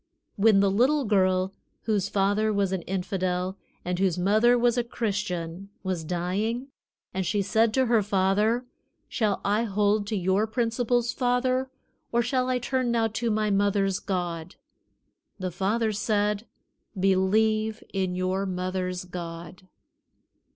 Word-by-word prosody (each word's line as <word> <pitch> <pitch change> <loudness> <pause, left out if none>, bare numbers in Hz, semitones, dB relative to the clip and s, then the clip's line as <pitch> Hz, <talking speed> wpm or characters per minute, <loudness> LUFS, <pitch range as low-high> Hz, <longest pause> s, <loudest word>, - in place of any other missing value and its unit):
When 205 -1 +5
the 200 -1 +3
little 260 +7 +3
girl 185 -2 +2 0.3
whose 205 -3 0
father 205 +2 +1
was 200 -2 +1
an 190 -2 -1
infidel 185 0 -2 0.3
and 180 0 -2
whose 190 -3 +1
mother 215 +7 +4
was 240 -1 +3
a 245 - +1
Christian 195 -6 -3
was 185 -4 -2
dying, 195 - -2 0.4
and 190 - -1
she 200 +3 0
said 220 +3 +2
to 260 -1 +3
her 230 -2 +3
father, 205 +4 +1 0.4
"Shall 210 -5 0
I 210 +3 +2
hold 205 0 +1
to 215 - -2
your 190 +3 +1
principles, 240 +1 0
father, 255 +1 +1 0.4
or 235 0 +2
shall 255 +1 0
I 255 - +2
turn 255 0 -1
now 230 -1 +2
to 230 +2 -2
my 215 -1 +1
mother's 195 -1 +1
God?" 175 -2 -3 0.8
the 185 -2 -3
father 215 +5 0
said: 210 +1 0 0.5
"Believe 215 +3 +2
in 190 -2 -1
your 185 +2 -1
mother's 185 0 -3
God." 175 +1 -8
205 Hz, 135 wpm, -26 LUFS, 185-225 Hz, 0.8 s, When